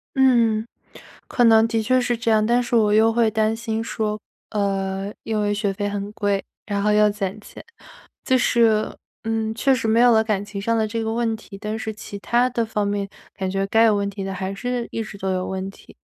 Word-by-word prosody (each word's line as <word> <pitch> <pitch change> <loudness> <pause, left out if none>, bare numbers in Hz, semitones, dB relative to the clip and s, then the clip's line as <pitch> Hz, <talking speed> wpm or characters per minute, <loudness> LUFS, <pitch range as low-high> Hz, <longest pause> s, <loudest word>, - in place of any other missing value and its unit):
嗯， 235 -5 +3 0.6
可 245 - +1
能 225 0 +6
的 225 -1 0
确 255 +3 +2
是 245 -1 0
这 230 -1 0
样， 215 -1 +3
但 240 +2 +3
是 240 - -2
我 210 -2 +4
又 220 +1 +5
会 230 -1 +3
担 220 0 +1
心 225 -1 -3
说， 215 -1 -2 0.3
呃， 195 -1 -2
因 220 -1 -1
为 205 0 +1
学 205 -1 -1
费 205 +1 -2
很 205 0 -4
贵， 205 -2 0 0.2
然 200 -1 -2
后 210 - +2
要 210 0 +5
攒 205 0 -4
钱。 - - -12 0.6
就 260 - +3
是， 230 -3 +3 0.3
嗯， 225 -1 -1
确 270 +3 +3
实 230 -3 -1
没 225 +1 +3
有 245 0 +6
了 220 -1 +4
感 205 -3 -1
情 200 -1 -6
上 230 +2 +1
的 220 -1 +1
这 230 +1 -3
个 220 0 -2
问 230 -1 0
题， 200 -2 -12
但 210 +2 -4
是 220 0 -4
其 205 -1 -9
他 240 +4 +2
的 235 -2 -1
方 210 -2 -1
面， 200 -1 -2 0.3
感 190 -2 -3
觉 195 +1 -1
该 225 +3 +4
有 220 -2 +5
问 200 0 -1
题 200 -1 -6
的 195 - -4
还 190 +1 -4
是 245 +3 -3
一 225 - -3
直 215 -2 -10
都 190 0 -2
有 185 0 -1
问 190 0 -4
题。 - - -18
215 Hz, 245 characters per minute, -22 LUFS, 200-230 Hz, 0.6 s, 能